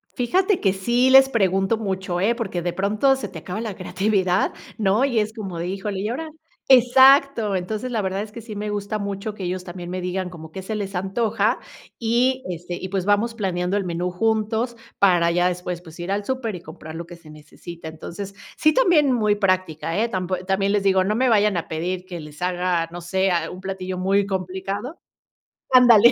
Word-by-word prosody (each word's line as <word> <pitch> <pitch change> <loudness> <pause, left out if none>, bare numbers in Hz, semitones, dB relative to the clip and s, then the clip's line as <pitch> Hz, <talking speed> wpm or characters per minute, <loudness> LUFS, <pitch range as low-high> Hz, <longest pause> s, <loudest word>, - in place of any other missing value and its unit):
fíjate 365 - +2
que 195 -2 +3
sí 240 +7 +2
les 265 0 +8
pregunto 195 -3 +1
mucho, 190 -4 -2
¿eh? 225 +5 +2
Porque 195 -7 -3
de 175 0 -1
pronto 215 +8 +2
se 265 -6 -5
te 175 -3 -8
acaba 185 +7 -5
la 215 -4 -4
creatividad, 190 0 0 0.2
¿no? 210 +4 +2
Y 240 -5 +1
es 215 +1 -1
como 195 -6 -6
de: 170 - -3
"Híjole, 195 +1 -3
¿y 210 - -2
ahora?". 315 +6 -4 0.4
Exacto, 260 -3 +6
entonces, 215 +7 -4
la 225 -3 0
verdad 190 +1 -2
es 210 0 -7
que 235 - -8
sí 215 -1 -8
me 210 +1 -3
gusta 205 +1 -2
mucho 200 +1 -4
que 200 - -8
ellos 180 +1 -3
también 175 0 -7
me 185 +1 -3
digan 180 0 -3
como 160 -3 -11
que 190 - -6
se 215 +3 -4
les 195 -2 -4
antoja 195 +5 0 0.4
y, 245 +3 +2
este, 175 0 -5
y 190 - -5
pues 190 -1 -2
vamos 205 +3 +2
planeando 185 -3 -1
el 205 - +1
menú 175 +1 -2
juntos 220 +4 0 0.2
para 175 -4 +4
ya 175 +1 +2
después, 180 -1 -4
pues 165 0 -14
ir 175 +2 -5
al 200 +1 0
súper 250 -4 -3
y 175 - -8
comprar 155 0 -10
lo 170 - -6
que 175 +1 -11
se 165 -2 -17
necesita. 160 +2 -10
Entonces, 190 +5 -8 0.2
sí, 310 0 +3
también 320 - +4
muy 215 -4 +2
práctica, 185 -4 0
eh, 230 - +2
tampo 185 -3 -2
también 195 +1 +1
les 205 -1 +1
digo, 190 -1 +3
no 210 +3 0
me 260 +1 +3
vayan 210 -5 +3
a 165 - -3
pedir 180 +3 -3
que 175 -3 -7
les 150 +1 -12
haga 180 -2 0
no 175 - -6
sé 190 +3 0
ah 170 -2 0
un 185 - -9
platillo 185 -1 -5
muy 195 +2 +2
complicado, 195 - -4 0.7
andale. 240 -2 +8
195 Hz, 210 wpm, -23 LUFS, 180-220 Hz, 0.7 s, les